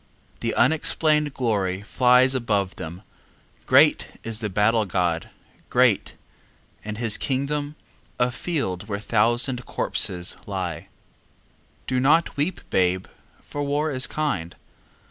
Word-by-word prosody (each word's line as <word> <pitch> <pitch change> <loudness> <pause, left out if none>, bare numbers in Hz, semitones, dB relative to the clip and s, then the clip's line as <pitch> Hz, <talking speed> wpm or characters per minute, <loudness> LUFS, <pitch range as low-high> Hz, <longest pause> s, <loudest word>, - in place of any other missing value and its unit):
The - - -2
unexplained 150 +2 +2
glory 100 -6 -1
flies 125 +3 +4
above 105 -7 -1
them, 85 +5 -8 0.6
Great - - +5 0.2
is 115 -1 -3
the 110 -2 -3
battle 105 +3 +2
god, 85 -3 -1 0.4
great, - - +2 0.7
and 105 0 -5
his 115 -2 +2
kingdom 145 +2 -2 0.4
A 125 0 +2
field 120 - -3
where 100 - -2
a 105 - -11
thousand 120 +3 +1
corpses 90 -1 0
lie. 90 -3 -4 1.0
Do 130 -1 0
not 150 +6 +3
weep, 150 +6 -1
babe, 90 0 +1 0.4
for 145 - -6
war 145 +2 0
is 130 -2 +1
kind. 100 - -2
115 Hz, 120 wpm, -24 LUFS, 95-140 Hz, 1.0 s, Great